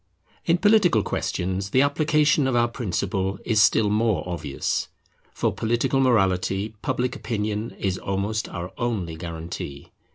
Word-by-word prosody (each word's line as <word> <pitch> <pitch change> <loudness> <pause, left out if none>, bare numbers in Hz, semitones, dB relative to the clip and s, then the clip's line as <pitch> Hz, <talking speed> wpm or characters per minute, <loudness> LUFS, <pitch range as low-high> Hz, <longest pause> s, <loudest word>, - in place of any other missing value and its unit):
In 170 - +4
political 190 - +4
questions 95 +2 -2
the 130 +6 +4
application 150 0 +2
of 130 - 0
our 120 0 +4
principle 95 -3 -2
is 110 -1 +3
still 105 +1 +4
more 105 -6 +1
obvious. 80 -6 -2 0.4
For - - -1
political 120 +4 0
morality 95 -4 +2
Public 125 +1 -1
Opinion 110 -1 -3
is 95 -2 -1
almost 100 +3 -2
our 90 0 -6
only 105 -9 -2
guarantee. 80 -4 -7
105 Hz, 130 wpm, -24 LUFS, 95-120 Hz, 0.4 s, In